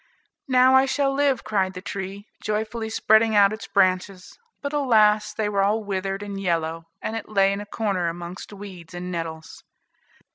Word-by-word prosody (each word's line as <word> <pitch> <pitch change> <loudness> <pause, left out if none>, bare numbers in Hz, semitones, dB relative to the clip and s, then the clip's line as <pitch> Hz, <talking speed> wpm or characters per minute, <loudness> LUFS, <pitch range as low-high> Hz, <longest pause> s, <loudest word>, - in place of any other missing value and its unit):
"Now 255 0 +5
I 265 +1 +5
shall 275 0 +1
live," 275 -3 +1
cried 190 -3 0
the - - -5
tree, 200 0 -6 0.2
joyfully 220 +1 -2
spreading 220 0 +3
out 200 0 +5
its 220 - -7
branches; 185 -1 0 0.2
but 285 0 -5
alas! 215 -7 +3
they 210 0 -2
were 200 -1 +1
all 210 +3 +1
withered 195 0 -3
and 200 -1 -6
yellow, 165 -2 -1 0.2
and 220 - -3
it 225 - -6
lay 195 -2 +3
in 200 - -4
a 205 - -9
corner 200 -5 -1
amongst 175 +3 -6
weeds 185 -4 -10
and 180 +1 -5
nettles. 165 -2 -6
205 Hz, 175 wpm, -24 LUFS, 185-220 Hz, 0.2 s, Now